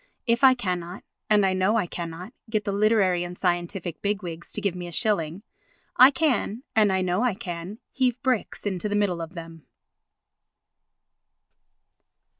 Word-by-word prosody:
If 235 +2 +1
I 260 -1 +8
cannot, 180 -5 -4 0.3
and 210 -2 +5
I 190 - +2
know 185 +4 +2
I 220 - +2
cannot, 170 +5 -7 0.2
get 215 -2 0
the 200 - -1
literary 200 -4 +2
and 175 0 -7
scientific 175 -1 -2
big 205 0 -1
wigs 170 -1 -7
to - - -2
give 200 -3 0
me 180 -1 -6
a - - -8
shilling, 175 -1 0 0.5
I 255 - +9
can, 265 -5 0
and 210 -2 +4
I 190 0 +1
know 180 +3 0
I 245 -5 +1
can, 185 -1 -6
heave 255 -2 0
bricks 255 -6 -1
into 200 0 -2
the 205 - -1
middle 195 -5 0
of 165 +2 -7
them. 165 -2 -10
195 Hz, 165 wpm, -25 LUFS, 175-215 Hz, 0.5 s, I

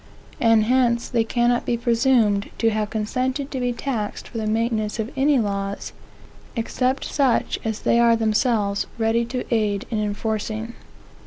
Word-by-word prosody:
And 225 -2 +4
hence 240 0 +2
they 235 -3 +1
cannot 240 +1 +1
be 235 - 0
presumed 230 -4 +2
to 225 -1 +2
have 215 -1 -1
consented 255 +6 -2
to 265 - -3
be 245 -1 0
taxed 235 -4 -4
for 230 - -6
the 215 - -2
maintenance 220 -1 0
of 220 +2 -3
any 275 +1 +3
laws, 200 -3 -2 0.6
except 255 +3 -1
such 270 -5 +1
as 220 -1 -3
they 235 - +3
are 235 -1 +5
themselves 220 -2 +1
ready 230 +1 +1
to 250 +1 -3
aid 210 -3 0
in 220 - 0
enforcing. 215 +2 -3
230 Hz, 155 wpm, -23 LUFS, 215-245 Hz, 0.6 s, are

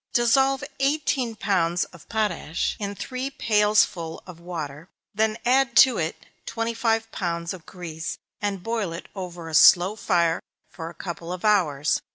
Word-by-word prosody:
_ - - -42
Dissolve 265 +3 +3 0.2
eighteen 275 -4 0
pounds 180 -4 +1
of 170 - -15
potash 210 -7 -1
in 200 -1 -4
three 255 +5 -4
pailsful 210 -8 +1
of 180 -3 -11
water; 165 -2 -6 0.2
then 215 +1 +1
add 265 +2 +3
to 255 -4 -3
it 160 -1 -3 0.2
twenty 230 0 -2
five 225 -1 0
pounds 170 -2 -3
of 180 -4 -12
grease, 165 -3 -6 0.2
and 200 -3 -2
boil 225 -7 -2
it 170 - -8
over 175 -3 -6
a 160 - -7
slow 180 +5 +7
fire 170 -6 +1 0.3
for 165 -1 -7
a 170 - -13
couple 170 -1 -6
of 180 +3 -5
hours. 160 -9 +2
195 Hz, 160 wpm, -25 LUFS, 170-225 Hz, 0.3 s, slow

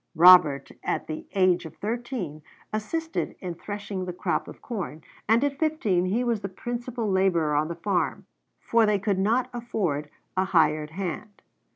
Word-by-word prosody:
Robert, 160 -5 +7
at - - -1
the 155 - -6
age 185 -2 +3
of 160 - -9
thirteen, 225 - -4 0.3
assisted 320 +10 -2
in 180 -2 -4
threshing 200 +1 -5
the 180 - -4
crop 170 -3 -1
of - - -10
corn, 185 -9 -5 0.3
and 230 +4 +5
at 280 -1 -1
fifteen 225 - +1
he 215 +7 +1
was 235 -4 0
the 195 - -4
principal 240 +3 -4
laborer 190 -6 +2
on 150 +1 +2
the 170 - -4
farm, 180 +1 -1 0.3
for 230 -2 +3
they 210 -1 +3
could 195 -1 0
not 230 +6 +2
afford 190 -12 -2 0.3
a 190 0 +2
hired 155 -4 +2
hand. 190 +4 -5
195 Hz, 165 wpm, -26 LUFS, 170-230 Hz, 0.3 s, Robert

